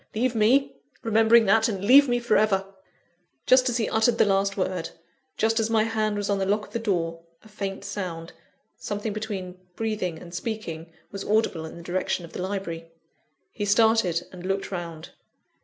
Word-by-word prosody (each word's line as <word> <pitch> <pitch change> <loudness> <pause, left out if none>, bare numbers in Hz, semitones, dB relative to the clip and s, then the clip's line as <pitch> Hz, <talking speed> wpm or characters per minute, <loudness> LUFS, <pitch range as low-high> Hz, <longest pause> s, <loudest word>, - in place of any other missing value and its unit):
Leave 245 +3 +1
me, 240 +5 +3 0.3
remembering 225 +1 +5
that 220 +3 +4
and 200 -3 -3
leave 275 +4 +7
me 245 - +2
for 235 -2 +1
ever!" 195 -2 +2 0.8
Just 255 0 +5
as 240 - 0
he 225 - 0
uttered 225 +1 +2
the - - +5
last 195 0 +1
word, 185 -3 -2 0.5
just 225 +1 +2
as 225 0 0
my 220 -1 +3
hand 215 -2 -1
was 205 -1 -2
on 200 -1 0
the 190 - 0
lock 210 +1 +1
of - - -19
the 235 - -1
door, 170 -6 -1 0.2
a - - -16
faint 200 -2 -5
sound 180 -5 -5 0.4
something 205 +1 -4
between 195 -4 -5 0.2
breathing 210 -7 -2
and 170 +1 -12
speaking 175 -5 -5 0.2
was 200 - -5
audible 205 -7 0
in 160 - -9
the 170 - -10
direction 180 0 -2
of 165 - -15
the - - -5
library. 185 -4 -4 0.6
He 210 - -5
started, 205 -5 +3
and 180 -1 -10
looked 195 +1 -2
round. 170 -3 -6
205 Hz, 185 wpm, -25 LUFS, 180-225 Hz, 0.8 s, leave